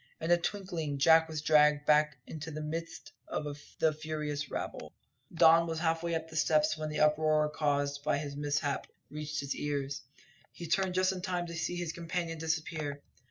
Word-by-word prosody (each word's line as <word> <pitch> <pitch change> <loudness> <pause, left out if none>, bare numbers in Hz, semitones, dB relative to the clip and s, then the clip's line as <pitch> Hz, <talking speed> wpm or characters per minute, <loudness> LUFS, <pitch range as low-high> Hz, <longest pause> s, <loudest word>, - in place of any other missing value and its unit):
In 165 +2 -1
a 175 - +7
twinkling 175 -5 -3
Jack 160 +3 +5
was 155 -2 -4
dragged 150 -1 +5
back 150 -1 +4
into 155 0 -7
the 155 -1 -5
midst 165 +2 -5 0.2
of 145 -1 -3 0.2
the 160 -1 +3
furious 150 -2 -4
rabble. - - -5 0.4
Don 165 0 +6
was 165 -1 -3
half 165 0 +1
way 170 -1 -1
up 160 0 -3
the 160 - -12
steps 155 -1 +3
when 155 0 -4
the 150 - -3
uproar 150 0 +3
caused 145 -1 0
by 145 - +1
this 145 -1 -4
mishap 145 -1 -1 0.2
reached 150 0 -4
his 140 0 -3
ears. 140 -1 -3 0.5
He 170 - -8
turned 185 +2 +1
just 185 0 +3
in 185 -1 -5
time 180 -2 -2
to 170 - -7
see 165 +2 -2
his 175 -2 -3
companion 170 -1 -3
disappear. 155 -3 -3
155 Hz, 185 wpm, -31 LUFS, 150-165 Hz, 0.5 s, a